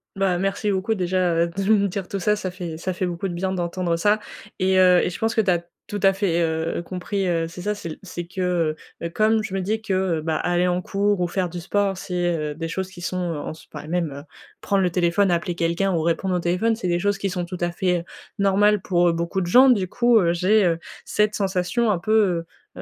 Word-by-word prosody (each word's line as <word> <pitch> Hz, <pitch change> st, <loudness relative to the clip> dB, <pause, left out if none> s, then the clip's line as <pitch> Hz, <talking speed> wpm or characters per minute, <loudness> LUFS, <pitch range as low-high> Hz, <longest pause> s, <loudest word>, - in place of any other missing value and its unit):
Bah, 195 Hz, -2 st, +1 dB
merci 195 Hz, +2 st, 0 dB
beaucoup 195 Hz, +3 st, 0 dB
déjà, 180 Hz, -2 st, +1 dB
heu, 170 Hz, +1 st, +2 dB
de 195 Hz, -, -1 dB
me 200 Hz, -2 st, +4 dB
dire 195 Hz, -1 st, -4 dB
tout 195 Hz, -, -4 dB
ça, 210 Hz, +3 st, +2 dB
ça 200 Hz, -3 st, -4 dB
fait 175 Hz, -3 st, -6 dB
ça 185 Hz, +3 st, -3 dB
fait 180 Hz, +1 st, -2 dB
beaucoup 175 Hz, +2 st, -3 dB
de 180 Hz, -, -4 dB
bien, 185 Hz, +2 st, -2 dB
d'entendre 175 Hz, -1 st, -1 dB
ça, 205 Hz, +5 st, +2 dB, 0.4 s
et 185 Hz, 0 st, +2 dB
heu, 180 Hz, -1 st, +6 dB
et -, -, 0 dB
je -, -, -7 dB
pense 225 Hz, 0 st, 0 dB
que 220 Hz, -, +4 dB
tu 195 Hz, -3 st, +2 dB
as 170 Hz, -1 st, 0 dB, 0.2 s
tout 205 Hz, -, -5 dB
à 195 Hz, 0 st, +6 dB
fait, 190 Hz, -4 st, 0 dB
heu, 160 Hz, 0 st, -1 dB
compris, 185 Hz, +2 st, -3 dB
heu, 165 Hz, -2 st, 0 dB
c'est 175 Hz, +2 st, -9 dB
ça 210 Hz, +3 st, -1 dB
c'est 185 Hz, -5 st, -7 dB
l 155 Hz, -, -7 dB
c'est 175 Hz, -2 st, -6 dB
que, 185 Hz, +2 st, -6 dB
heu 170 Hz, -4 st, +1 dB, 0.3 s
heu, -, -, -2 dB
comme 215 Hz, +3 st, +2 dB
je 205 Hz, -, -6 dB
me 195 Hz, -, -1 dB
dis 215 Hz, +4 st, -1 dB
que, 210 Hz, -3 st, -2 dB, 0.2 s
heu, -, -, -3 dB
bah, 160 Hz, 0 st, -1 dB
aller 175 Hz, +2 st, +1 dB
en 180 Hz, 0 st, 0 dB
cours 200 Hz, +1 st, 0 dB
ou 175 Hz, -, +1 dB
faire 180 Hz, +1 st, -1 dB
du 175 Hz, +1 st, -6 dB
sport, 195 Hz, +2 st, 0 dB
c'est, 175 Hz, -2 st, -1 dB
heu, 150 Hz, -2 st, -3 dB
des 165 Hz, +1 st, -4 dB
choses 190 Hz, +3 st, -3 dB
qui 185 Hz, -2 st, -12 dB
sont, 180 Hz, +1 st, -3 dB, 0.2 s
heu, -, -, -4 dB
en -, -, -5 dB
spa 155 Hz, -1 st, -11 dB
même, 170 Hz, -2 st, -1 dB
heu, 140 Hz, +1 st, -8 dB, 0.4 s
prendre 200 Hz, -1 st, +1 dB
le 180 Hz, -, +2 dB
téléphone, 175 Hz, +3 st, +2 dB
appeler 175 Hz, 0 st, 0 dB
quelqu'un 170 Hz, +3 st, 0 dB
ou 165 Hz, -, +1 dB
répondre 170 Hz, +3 st, 0 dB
au -, -, +1 dB
téléphone, 180 Hz, +7 st, +1 dB
c'est 220 Hz, -4 st, -4 dB
des 175 Hz, 0 st, +1 dB
choses 205 Hz, +2 st, 0 dB
qui 195 Hz, -, -1 dB
sont 180 Hz, -1 st, -3 dB
tout 180 Hz, +1 st, -6 dB
à 175 Hz, 0 st, 0 dB
fait, 180 Hz, -1 st, 0 dB, 0.4 s
normales 200 Hz, +1 st, +3 dB
pour, 175 Hz, -1 st, +2 dB
heu, -, -, +1 dB
beaucoup 170 Hz, +3 st, -2 dB
de 175 Hz, -, -2 dB
gens. 255 Hz, +9 st, +7 dB
Du 200 Hz, -7 st, +3 dB
coup, 240 Hz, +4 st, +3 dB
heu, 170 Hz, -3 st, +2 dB
j'ai, 195 Hz, +4 st, +3 dB
heu, 165 Hz, -2 st, +1 dB, 0.3 s
cette 210 Hz, 0 st, +1 dB
sensation 200 Hz, +4 st, 0 dB
un 185 Hz, -, 0 dB
peu, 215 Hz, +5 st, +1 dB, 0.6 s
heu -, -, -6 dB
180 Hz, 260 wpm, -23 LUFS, 170-200 Hz, 0.6 s, gens